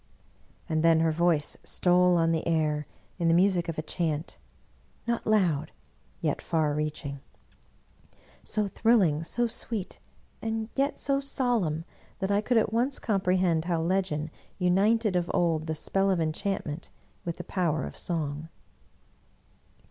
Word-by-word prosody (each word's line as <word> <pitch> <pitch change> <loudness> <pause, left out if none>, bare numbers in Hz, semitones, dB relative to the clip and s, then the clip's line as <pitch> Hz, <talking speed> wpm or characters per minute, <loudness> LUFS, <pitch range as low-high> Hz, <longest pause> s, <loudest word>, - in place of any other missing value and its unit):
And 160 -2 0
then 165 0 +5
her 165 -1 +3
voice 165 -2 +1
stole 180 0 +3
on 165 0 +3
the 165 0 -1
air 155 -3 +1 0.3
in 170 - +1
the 165 - +5
music 180 -1 +3
of 165 - -4
a 155 - -2
chant, 160 -2 -2 0.7
not 235 -1 -1
loud 175 -9 +2 0.5
yet 155 -4 0
far 155 -3 +1
reaching; 150 -2 -3 1.2
so 210 -1 0
thrilling, 195 -8 +3
so 240 +8 0
sweet 220 -3 -4 0.4
and 225 0 -2
yet 275 +1 0
so 275 0 +1
solemn 235 - 0 0.3
that 195 0 -1
I 200 +1 +3
could 240 +2 +1
at 220 -1 +2
once 250 +4 +1
comprehend 185 -5 +1
how 170 -2 0
legend 165 -3 0 0.3
united 200 +3 +2
of 175 -1 0
old 165 -2 +1
the 160 - -1
spell 195 +5 0
of 185 -3 +2
enchantment 165 -1 -2 0.3
with 170 -1 -4
the 180 - -6
power 165 -7 0
of - - -8
song. 155 -2 -3
175 Hz, 140 wpm, -28 LUFS, 160-200 Hz, 1.2 s, then